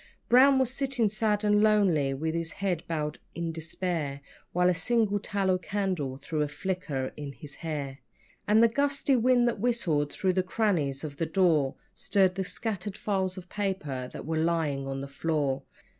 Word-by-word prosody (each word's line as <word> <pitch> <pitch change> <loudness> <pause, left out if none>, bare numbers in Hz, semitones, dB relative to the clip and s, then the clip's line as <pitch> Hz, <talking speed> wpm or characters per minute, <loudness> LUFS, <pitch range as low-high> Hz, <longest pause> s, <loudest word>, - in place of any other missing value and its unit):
Brown 265 +2 +7
was 260 -2 +2
sitting 265 -5 0
sad 215 0 0
and 210 0 +4
lonely 195 -10 +3
with 160 +4 -2
his 165 -1 -3
head 185 -4 -1
bowed 150 -2 -2 0.2
in 170 -1 -2
despair, 160 -3 -3 0.3
While 180 +1 +3
a 180 - +4
single 215 +1 +1
tallow 190 -2 0
candle 185 -10 -2
threw 150 +2 -3
a 150 - +1
flicker 145 -4 -3
on 140 -2 -5
his 150 0 -11
hair, 145 -4 -4 0.5
And 215 +2 +5
the - - +8
gusty 280 +3 +1
wind 245 0 +4
that 230 -3 -1
whistled 180 -11 +1
through 185 -1 0
the 185 - +2
crannies 180 -9 0
of 145 -2 -6
the 165 - -1
door 160 -6 +2 0.2
Stirred 190 -3 +2
the 190 +1 -2
scattered 200 +1 -4
files 190 -2 -1
of 185 -1 -8
paper 155 -11 -3
that - - -8
were 160 +1 -1
lying 160 -5 0
on 135 0 -3
the 140 - -5
floor. 140 -2 -1
180 Hz, 175 wpm, -28 LUFS, 150-210 Hz, 0.5 s, the